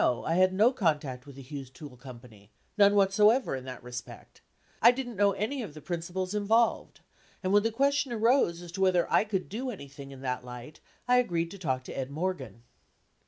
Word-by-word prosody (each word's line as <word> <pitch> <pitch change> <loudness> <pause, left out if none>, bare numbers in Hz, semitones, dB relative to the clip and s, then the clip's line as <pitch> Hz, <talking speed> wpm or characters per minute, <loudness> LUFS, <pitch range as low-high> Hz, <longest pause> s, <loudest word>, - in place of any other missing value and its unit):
I 125 +6 +1
had 185 +2 +4
no 210 +6 +4
contact 150 - -1
with 140 - -11
the 135 - -10
Hughes 135 -1 -8
Tool 135 +1 -11
Co., 125 -1 -11 0.6
none 205 -1 +5
whatsoever 210 - +4
in 130 -1 -7
that 130 -2 -8
respect. 125 0 -9 0.4
I 235 - +9
didn't 245 -1 -2
know 200 0 +3
any 220 +8 -2
of 170 -10 -7
the - - -8
principals 180 +3 -4
involved. 220 +2 +1 0.4
And 185 +1 0
when 205 - +6
the 225 +2 0
question 280 +2 +1
arose 225 -7 +2
as 175 - -10
to 190 +2 -5
whether 185 -2 +3
I - - +5
could 195 -3 -2
do 250 +6 -4
any 185 - -7
thing 140 0 -11
in 135 -1 -11
that 125 -1 -3
light, 125 +4 -10 0.3
I 250 0 +5
agreed 170 -8 0
to 200 - -10
talk 130 -7 -2
to - - -8
Ed 130 -1 -3
Morgan." 140 - -4
185 Hz, 205 wpm, -29 LUFS, 135-215 Hz, 0.6 s, I